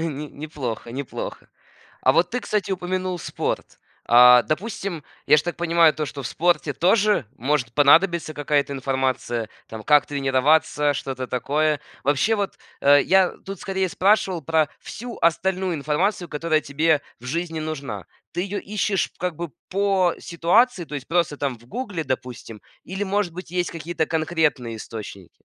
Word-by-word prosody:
Не 150 -2 -3
неплохо, 135 -7 -6
неплохо. 135 0 -6 0.5
А - - +5
вот 175 +1 +3
ты, 250 - -1
кстати, 210 -5 -2
упомянул 185 0 -2
спорт. - - -4 0.3
А, 125 0 +8
допустим, 185 -1 -3 0.2
я - - +6
ж - - +3
так 175 +1 -4
понимаю 170 -1 +4
то, 155 - -3
что 140 -1 -7
в 125 - -4
спорте 170 -4 +1
тоже 205 - +3
может 130 -2 0
понадобиться 160 +2 +4
какая-то 145 -1 0
информация, 130 -4 -1 0.2
там 110 -1 -8
как 150 -2 +5
тренироваться, 145 +2 +2
что-то 130 -2 -4
такое. 145 +5 0 0.2
Вообще 150 +11 +2
вот, 200 -2 -3 0.2
э, 145 0 +6
я 190 +2 +4
тут, 195 0 -9
скорее, 190 -1 -1
спрашивал 190 -3 +2
про 155 0 +2
всю 240 0 -8
остальную 185 +2 +1
информацию, 165 +5 -1
которая 155 +1 0
тебе 150 +1 +1 0.2
в 120 - -13
жизни 165 +4 -3
нужна. 140 -10 -5 0.3
Ты 175 - -2
её 200 +2 -3
ищешь, 205 -1 -1
как 180 -2 -2
бы, 170 0 -5 0.2
по 190 -2 +2
ситуации, 180 +5 +2
то - - -11
есть 140 -3 -5
просто, 170 -3 +1
там, 135 -4 -2
в 120 - -20
"Гугле", 205 - -4
допустим, 125 -5 -5 0.2
или, 190 +3 -4
может 195 -3 -1
быть, 180 -2 -8
есть 180 0 -1
какие-то 165 -1 -2
конкретные 155 -7 0
источники? 105 -4 -9
160 Hz, 155 wpm, -23 LUFS, 140-180 Hz, 0.5 s, А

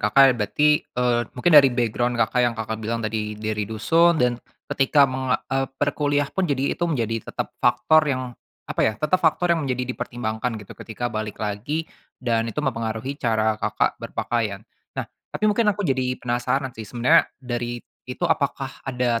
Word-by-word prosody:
Kakak 130 +6 +6
berarti, 150 +8 +3
eee, 120 -1 +1 0.2
mungkin 165 +8 +2
dari 145 -3 +9
background 120 0 0
Kakak, 115 +2 +2
yang 120 -1 +2
Kakak 110 0 -4
bilang 115 +1 -2
tadi 105 -1 -3
dari 105 -1 -3
dusun. 165 +11 +3
Dan 125 -4 +1 0.3
ketika 140 +1 +4
meng 130 -3 0 0.2
eee, 135 0 +1
perkuliah 145 0 +1
pun 190 -3 0
jadi 140 -1 0
itu - - -10
menjadi 115 -7 -2
tetap - - -4
faktor 125 +6 +4
yang 130 -2 0 0.4
apa - - -3
ya, 110 - +3
tetap 155 +9 +1
faktor 170 +2 +3
yang 165 - 0
menjadi 125 0 -1
dipertimbangkan 120 -2 -3
gitu 105 -2 -10
ketika 120 +1 -5
balik 110 -1 -4
lagi, 110 +10 -3 0.3
dan 115 -2 0
itu 115 - -8
mempengaruhi 115 -1 -2
cara, 110 -2 +1
Kakak - - 0
berpakaian. 110 -4 -2 0.3
Nah, - - -1 0.2
tapi - - -4
mungkin 215 +1 +3
aku 205 -1 0
jadi 130 -3 0
penasaran 125 +2 -1
sih, 110 -3 -9
sebenarnya 125 +9 +4
dari 120 -2 -4 0.2
itu 125 +7 -3
apakah 140 -4 0 0.2
ada 125 -3 0
125 Hz, 170 wpm, -23 LUFS, 110-140 Hz, 0.4 s, dari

